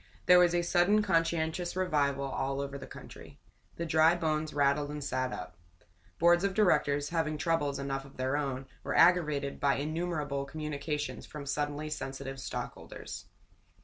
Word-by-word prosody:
There 180 Hz, 0 st, +8 dB
was 175 Hz, -1 st, +4 dB
a 175 Hz, -, +2 dB
sudden 180 Hz, +5 st, +3 dB
conscientious 165 Hz, -1 st, 0 dB
revival 145 Hz, -7 st, +1 dB
all 135 Hz, 0 st, -2 dB
over 140 Hz, 0 st, -4 dB
the 135 Hz, -, -7 dB
country. -, -, -12 dB, 0.4 s
The 170 Hz, -, -3 dB
dry 160 Hz, +1 st, +4 dB
bones 155 Hz, -2 st, -1 dB
rattled 145 Hz, 0 st, +2 dB
and 150 Hz, 0 st, -5 dB
sat 130 Hz, -2 st, -1 dB
up. 90 Hz, -5 st, -7 dB, 0.6 s
Boards 175 Hz, +2 st, +4 dB
of 195 Hz, -1 st, 0 dB
directors, 145 Hz, -8 st, +2 dB
having 160 Hz, -2 st, -1 dB
troubles 150 Hz, -3 st, 0 dB
enough 135 Hz, -1 st, -3 dB
of 135 Hz, -, -15 dB
their 130 Hz, +2 st, 0 dB
own, 135 Hz, -2 st, -2 dB, 0.2 s
were -, -, -1 dB
aggravated 150 Hz, -6 st, +3 dB
by 140 Hz, -1 st, +3 dB
innumerable 150 Hz, -2 st, -2 dB
communications 150 Hz, 0 st, -4 dB
from 150 Hz, -2 st, -8 dB
suddenly 145 Hz, +2 st, -2 dB
sensitive 135 Hz, -1 st, -5 dB
stockholders. 125 Hz, -1 st, -7 dB
150 Hz, 150 wpm, -31 LUFS, 140-165 Hz, 0.6 s, There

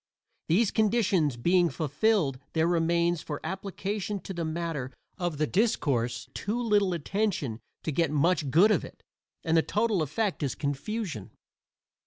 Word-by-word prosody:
These 200 Hz, +6 st, +3 dB
conditions 200 Hz, -, +2 dB
being 175 Hz, +7 st, +3 dB
fulfilled 155 Hz, -2 st, +1 dB
there 160 Hz, 0 st, +2 dB
remains 170 Hz, 0 st, +2 dB
for 145 Hz, -2 st, -5 dB
application 200 Hz, +1 st, -3 dB
to 195 Hz, -, -6 dB
the 170 Hz, -2 st, -3 dB
matter 160 Hz, -5 st, -3 dB, 0.3 s
of 175 Hz, -4 st, -2 dB
the 155 Hz, -, +2 dB
discourse 130 Hz, -, 0 dB
too 215 Hz, +5 st, -2 dB
little 205 Hz, -5 st, +2 dB
attention 170 Hz, -, -1 dB, 0.2 s
to 155 Hz, -, -1 dB
get 165 Hz, +2 st, +1 dB
much 150 Hz, 0 st, +2 dB
good 175 Hz, +11 st, +5 dB
of -, -, +2 dB
it, -, -, -12 dB, 0.4 s
and 165 Hz, -1 st, +1 dB
the 165 Hz, -, +6 dB
total 210 Hz, 0 st, +1 dB
effect 180 Hz, +7 st, -1 dB
is 140 Hz, -3 st, -1 dB
confusion. 145 Hz, -, -3 dB
170 Hz, 145 wpm, -28 LUFS, 150-205 Hz, 0.4 s, the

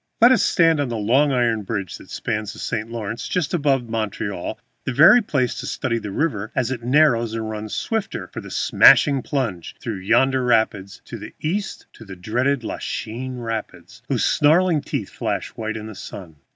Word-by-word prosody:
Let 240 Hz, +2 st, +7 dB
us 255 Hz, -, +4 dB
stand 165 Hz, -3 st, +3 dB
on 140 Hz, -3 st, -1 dB
the 115 Hz, -, -3 dB
long 130 Hz, +8 st, +3 dB
iron 120 Hz, -4 st, +1 dB
bridge 100 Hz, -3 st, -4 dB
that -, -, -15 dB
spans 105 Hz, -2 st, -3 dB
the -, -, -13 dB
St. 110 Hz, -1 st, -3 dB
Lawrence 115 Hz, -1 st, -5 dB
just 180 Hz, -5 st, -1 dB
above 140 Hz, -7 st, +1 dB
Montreal, 105 Hz, -4 st, -3 dB, 0.2 s
the -, -, -2 dB
very 160 Hz, -, +7 dB
place 130 Hz, -, 0 dB
to -, -, -5 dB
study 115 Hz, -1 st, -2 dB
the 105 Hz, -, -6 dB
river 110 Hz, -3 st, -2 dB
as 125 Hz, 0 st, 0 dB
it 125 Hz, -3 st, -3 dB
narrows 120 Hz, -3 st, +3 dB
and 110 Hz, -1 st, -3 dB
runs 110 Hz, -1 st, -5 dB
swifter 225 Hz, -3 st, -3 dB
for -, -, -8 dB
its -, -, -7 dB
smashing 140 Hz, -3 st, +5 dB
plunge 115 Hz, -, -3 dB
through 115 Hz, -5 st, -4 dB
yonder 130 Hz, +7 st, +2 dB
rapids 110 Hz, -5 st, 0 dB
to 115 Hz, -, -8 dB
the 105 Hz, -, -10 dB
east, 190 Hz, +6 st, -3 dB
the 100 Hz, -4 st, -10 dB
dreaded 125 Hz, +8 st, -1 dB
Lachine 125 Hz, +3 st, -5 dB
Rapids, 115 Hz, -2 st, -6 dB
whose 130 Hz, -4 st, 0 dB
snarling 160 Hz, +1 st, +3 dB
teeth 140 Hz, -, -4 dB
flash -, -, -3 dB
white 110 Hz, 0 st, -5 dB
in 110 Hz, -, -7 dB
the 110 Hz, -, -8 dB
sun. 90 Hz, -4 st, -10 dB
115 Hz, 185 wpm, -22 LUFS, 110-140 Hz, 0.2 s, Let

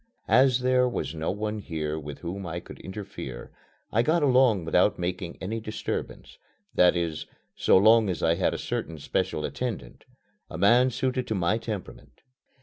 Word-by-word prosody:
As 125 Hz, +1 st, +4 dB
there 125 Hz, 0 st, +3 dB
was 100 Hz, -, -3 dB
no 80 Hz, 0 st, -3 dB
one 105 Hz, +2 st, -3 dB
here 80 Hz, -5 st, -3 dB
with 75 Hz, -2 st, -8 dB
whom 90 Hz, +3 st, -5 dB
I 85 Hz, +1 st, -4 dB
could -, -, -12 dB
interfere 95 Hz, -11 st, -8 dB, 0.4 s
I 115 Hz, -, +4 dB
got 155 Hz, +5 st, +2 dB
along 125 Hz, -, +4 dB
without 90 Hz, +4 st, +3 dB
making 90 Hz, 0 st, -4 dB
any 110 Hz, +4 st, -3 dB
disturbance 110 Hz, -1 st, -5 dB, 0.3 s
that 90 Hz, 0 st, +5 dB
is, 85 Hz, -3 st, -2 dB, 0.3 s
so -, -, +4 dB
long 110 Hz, +1 st, +5 dB
as 90 Hz, -, -3 dB
I 80 Hz, -, +4 dB
had -, -, 0 dB
a -, -, -3 dB
certain -, -, -4 dB
special 75 Hz, -, -2 dB
attendant, 110 Hz, -, -5 dB, 0.4 s
a -, -, -7 dB
man 120 Hz, +8 st, +5 dB
suited 130 Hz, 0 st, -2 dB
to 110 Hz, -, -1 dB
my 90 Hz, +4 st, +1 dB
temperament. 110 Hz, -4 st, -8 dB
100 Hz, 165 wpm, -26 LUFS, 85-120 Hz, 0.4 s, that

